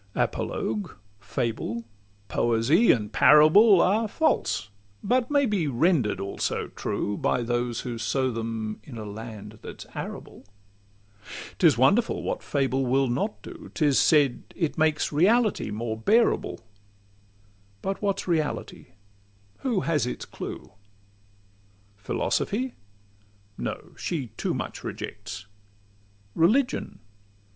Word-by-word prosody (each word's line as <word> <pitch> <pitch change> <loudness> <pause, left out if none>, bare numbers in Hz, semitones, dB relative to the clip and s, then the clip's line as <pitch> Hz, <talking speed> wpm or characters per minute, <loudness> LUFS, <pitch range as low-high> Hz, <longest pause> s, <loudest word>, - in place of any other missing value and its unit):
Apologue, 105 -2 -2 0.2
fable, 115 +3 -3 0.4
poesy, 120 - +3
and 105 -2 -1
parable, 175 +7 +7
Are 215 +4 +2
false, 210 - 0 0.3
but 250 0 +1
may 285 -2 +3
he 195 -8 0
render'd 135 - +2
also 100 0 -2
true, 105 - -3
By 120 - 0
those 120 0 -1
who 120 -3 -5
sow 130 +2 0
them 110 -1 -4
in 125 -5 -10
a 110 - -6
land 105 0 -8
that - - -9
's - - -8
arable. - - -7 1.2
'Tis - - +5
wonderful - - +3
what - - -2
fable 135 -1 0
will 135 +1 +2
not 190 - -2
do! 330 -4 -10
'Tis 145 -5 +3
said 145 -5 +4
it 165 -5 -1
makes 155 -1 +1
reality 205 - +3
more 110 +1 -3
bearable: 215 - +2 1.2
But 195 0 -2
what 200 -2 0
's - - -13
reality? 155 - -2 0.7
Who 235 -8 0
has 155 -7 0
its - - -5
clue? - - -8 1.2
Philosophy? 210 - -1 0.8
No: - - -5
she 145 -9 -3
too - - -2
much - - -5
rejects. 100 +1 -6 0.9
Religion? 240 - +1
135 Hz, 115 wpm, -26 LUFS, -, 1.2 s, parable